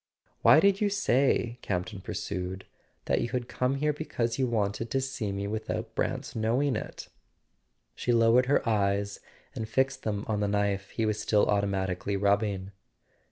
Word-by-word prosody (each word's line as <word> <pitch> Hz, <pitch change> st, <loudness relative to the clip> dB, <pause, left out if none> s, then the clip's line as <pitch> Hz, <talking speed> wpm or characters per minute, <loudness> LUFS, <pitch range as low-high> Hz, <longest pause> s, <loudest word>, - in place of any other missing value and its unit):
"Why -, -, +7 dB
did 200 Hz, 0 st, +3 dB
you 205 Hz, -, +3 dB
say," 130 Hz, -, +1 dB
Campton 95 Hz, +2 st, -3 dB
pursued, 95 Hz, -2 st, -4 dB, 0.4 s
"that -, -, +1 dB
you -, -, -2 dB
had 125 Hz, -1 st, -2 dB
come 125 Hz, +2 st, 0 dB
here 150 Hz, +2 st, +1 dB
because 120 Hz, -6 st, -2 dB
you 130 Hz, -, +2 dB
wanted 110 Hz, 0 st, -1 dB
to 135 Hz, -, +1 dB
see 130 Hz, -6 st, -3 dB
me 100 Hz, 0 st, -3 dB
without 110 Hz, +2 st, -4 dB
Brant's -, -, -2 dB
knowing 120 Hz, +5 st, +1 dB
it? -, -, -6 dB, 0.4 s
" 60 Hz, -1 st, -48 dB
She 125 Hz, -, -1 dB
lowered 120 Hz, +2 st, +4 dB
her 140 Hz, -2 st, +2 dB
eyes 100 Hz, -2 st, +1 dB, 0.3 s
and 110 Hz, -1 st, -5 dB
fixed 130 Hz, +3 st, +1 dB
them 105 Hz, -2 st, -2 dB
on 105 Hz, -2 st, 0 dB
the 105 Hz, -, +1 dB
knife 100 Hz, -1 st, 0 dB
he 115 Hz, -, -1 dB
was 105 Hz, -1 st, -1 dB
still 105 Hz, -1 st, +3 dB
automatically 100 Hz, -1 st, 0 dB
rubbing. 100 Hz, -1 st, +1 dB
110 Hz, 165 wpm, -28 LUFS, 100-125 Hz, 0.4 s, Why